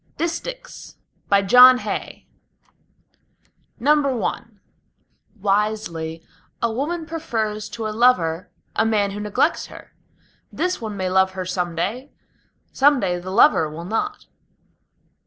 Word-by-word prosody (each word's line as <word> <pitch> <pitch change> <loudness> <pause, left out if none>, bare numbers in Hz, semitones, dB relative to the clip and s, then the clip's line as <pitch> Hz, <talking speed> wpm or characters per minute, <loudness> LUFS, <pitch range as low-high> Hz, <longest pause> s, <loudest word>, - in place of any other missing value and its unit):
DISTICHS - - -5 0.3
BY 200 0 +4
JOHN 250 +5 +8
HAY - - -6 1.6
I 280 -6 +1 1.0
Wisely 195 -6 -2 0.3
a 235 - 0
woman 315 +8 -3
prefers 220 -10 -3
to 220 +1 -6
a - - -1
lover 185 -8 +2 0.3
a - - +2
man 210 -3 +1
who 205 - -6
neglects 210 +10 0
her. - - -14 0.6
This 360 -5 -2
one 215 -3 -5
may 185 -1 -2
love 190 0 +3
her 185 -1 -5
some 180 -2 -3
day, 230 - -3 0.6
some 285 0 +4
day 180 -4 -1
the 180 +1 -8
lover 190 - +4
will 165 +3 -8
not. 320 - -3
215 Hz, 120 wpm, -21 LUFS, 190-265 Hz, 1.6 s, JOHN